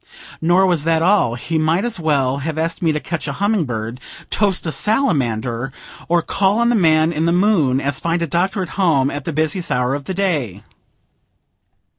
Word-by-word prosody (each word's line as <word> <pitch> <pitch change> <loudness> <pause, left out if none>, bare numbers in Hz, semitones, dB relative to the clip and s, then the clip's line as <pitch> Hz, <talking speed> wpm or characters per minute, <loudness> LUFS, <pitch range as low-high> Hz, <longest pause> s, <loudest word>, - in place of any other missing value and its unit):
Nor 175 +4 +3
was 175 -5 +1
that 165 0 +2
all; 190 - +3
he 160 +6 -2
might 165 +6 +1
as 235 -5 -1
well 140 -5 +1
have 155 +2 -4
asked 165 +1 -2
me 165 -3 +2
to 150 - -1
catch 165 0 -5
a 140 - -3
humming 200 +1 0
bird, 115 0 -5 0.3
toast 200 -4 +1
a 160 - -1
salamander, 135 - 0 0.4
or 170 0 +2
call 195 +4 +1
on 235 0 +2
the 240 - +2
man 160 -4 +3
in 160 0 -1
the 170 - +2
moon, 175 -8 +2
as 140 0 -2
find 170 0 -1
a - - +1
Doctor 185 +5 -1
at 180 - -7
home 140 -7 +2
at 145 -1 -6
the - - -2
busiest 160 +4 -1
hour 125 +1 +1
of 140 0 -4
the 190 - -4
day. 145 - -2
160 Hz, 200 wpm, -19 LUFS, 140-185 Hz, 0.4 s, Nor